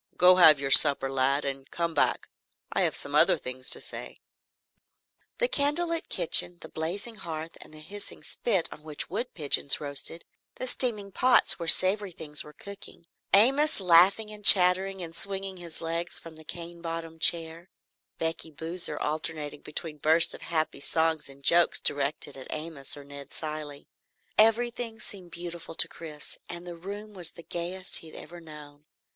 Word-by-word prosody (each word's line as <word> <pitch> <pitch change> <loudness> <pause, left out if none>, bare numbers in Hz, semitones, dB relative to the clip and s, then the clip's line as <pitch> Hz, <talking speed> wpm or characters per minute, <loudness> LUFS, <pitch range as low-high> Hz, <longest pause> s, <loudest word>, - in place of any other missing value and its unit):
"Go 180 +1 +6
have 155 -5 +7
your 135 0 -3
supper 140 -2 +8
lad, 135 +2 0
and 135 -1 -5
come 170 -1 -3
back. 145 - 0 0.5
I - - 0
have - - 0
some - - -4
other - - +5
things 130 0 -4
to - - +3
say." - - -6 1.2
The - - +1
candlelit 335 -2 -1
kitchen, 180 - +3
the - - -9
blazing 180 +9 -5
hearth, 165 -3 -7
the 155 - -15
hissing 200 +7 -10
spit 195 -8 -1
on - - -15
which 150 +1 -6
wood 235 +6 -3
pigeons 140 -3 +2
roasted; 145 +3 -2 0.3
the 255 - -6
steaming 220 -6 -1
pots 250 0 +4
where 170 - -6
savory 195 +3 +5
things 150 -2 -4
were 150 - -13
cooking; 200 +1 -11 0.3
Amos 270 +9 +3
laughing 190 +4 +4
and 210 0 -12
chattering 190 0 +7
and 165 -1 -10
swinging 195 0 -5
his 170 -2 -7
legs 165 +1 -4
from 165 -1 -11
the 160 - -13
cane 170 +1 -9
bottomed 165 -1 -7
chair; 165 +1 +2 0.5
Becky 165 0 -4
Boozer 160 +1 -5
alternating 150 -1 -4
between 150 0 -6
bursts 160 +3 +4
of - - -11
happy 155 -3 -3
song 160 +2 0
and 135 0 -16
jokes 170 +3 +3
directed 145 0 0
at 130 -1 -11
Amos 155 -3 -5
or 145 - -11
Ned 140 0 -12
Cilley, 150 -2 -7 0.5
everything 230 +1 +2
seemed 190 -5 -9
beautiful 170 -1 -8
to - - +3
Chris 155 -3 -10
and 175 0 -9
the 175 - -8
room 205 +5 -9
the 175 -2 -5
gayest 180 +2 -4
he 165 - -9
had 155 - -14
ever 175 +3 -11
known. 150 -2 -14
165 Hz, 165 wpm, -27 LUFS, 155-195 Hz, 1.2 s, supper